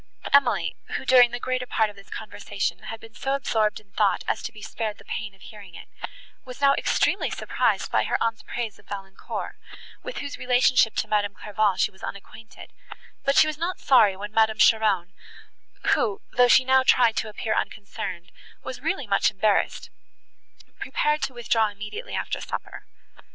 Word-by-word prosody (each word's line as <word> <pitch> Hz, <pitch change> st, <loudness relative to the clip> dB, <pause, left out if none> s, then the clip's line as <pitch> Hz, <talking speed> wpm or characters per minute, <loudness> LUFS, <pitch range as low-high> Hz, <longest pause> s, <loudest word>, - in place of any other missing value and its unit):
Emily, 280 Hz, 0 st, +3 dB, 0.2 s
who, -, -, -8 dB
during 245 Hz, -1 st, +7 dB
the 245 Hz, +1 st, -5 dB
greater 255 Hz, 0 st, -2 dB
part 220 Hz, -3 st, +1 dB
of -, -, -19 dB
this 195 Hz, 0 st, -16 dB
conversation, 205 Hz, -2 st, -4 dB
had 225 Hz, -, -6 dB
been 225 Hz, 0 st, -14 dB
so 270 Hz, +3 st, -1 dB
absorbed 220 Hz, -6 st, 0 dB
in 205 Hz, -2 st, -25 dB
thought 205 Hz, 0 st, +1 dB
as -, -, -1 dB
to -, -, -5 dB
be 210 Hz, -, -13 dB
spared 220 Hz, -2 st, -4 dB
the -, -, -17 dB
pain 210 Hz, -2 st, -5 dB
of 190 Hz, -, -25 dB
hearing 200 Hz, -5 st, -12 dB
it, -, -, -12 dB, 0.5 s
was 255 Hz, 0 st, -10 dB
now 280 Hz, 0 st, +5 dB
extremely -, -, +1 dB
surprised -, -, -1 dB
by -, -, +2 dB
her -, -, 0 dB
aunt's 225 Hz, -1 st, -1 dB
praise 235 Hz, -4 st, -5 dB
of -, -, -22 dB
Valancourt, 195 Hz, -1 st, -6 dB, 0.4 s
with -, -, -7 dB
whose 285 Hz, 0 st, -5 dB
relationship 250 Hz, -2 st, +3 dB
to -, -, -1 dB
Madame 205 Hz, -1 st, 0 dB
Clairval 210 Hz, -1 st, 0 dB
she 190 Hz, -, +2 dB
was 190 Hz, -, -21 dB
unacquainted; 215 Hz, +2 st, -10 dB, 0.5 s
but 275 Hz, 0 st, +2 dB
she -, -, +8 dB
was 310 Hz, -1 st, -4 dB
not 360 Hz, +3 st, -2 dB
sorry 215 Hz, -8 st, +5 dB
when 205 Hz, +1 st, -6 dB
Madame 220 Hz, -1 st, +3 dB
Cheron, 205 Hz, -6 st, +3 dB, 0.8 s
who, 205 Hz, -3 st, 0 dB
though 245 Hz, 0 st, +5 dB
she 255 Hz, +1 st, +6 dB
now 260 Hz, 0 st, +5 dB
tried 245 Hz, -3 st, +4 dB
to 220 Hz, -, -1 dB
appear 215 Hz, +1 st, -2 dB
unconcerned, 200 Hz, -4 st, -4 dB, 0.3 s
was -, -, -7 dB
really 290 Hz, -9 st, -1 dB
much 200 Hz, -2 st, +3 dB
embarrassed, 205 Hz, +1 st, 0 dB, 0.9 s
prepared 300 Hz, 0 st, 0 dB
to 265 Hz, -, -2 dB
withdraw 225 Hz, -2 st, +2 dB
immediately 210 Hz, -, -7 dB
after -, -, -3 dB
supper. -, -, -7 dB
220 Hz, 175 wpm, -25 LUFS, 205-255 Hz, 0.9 s, she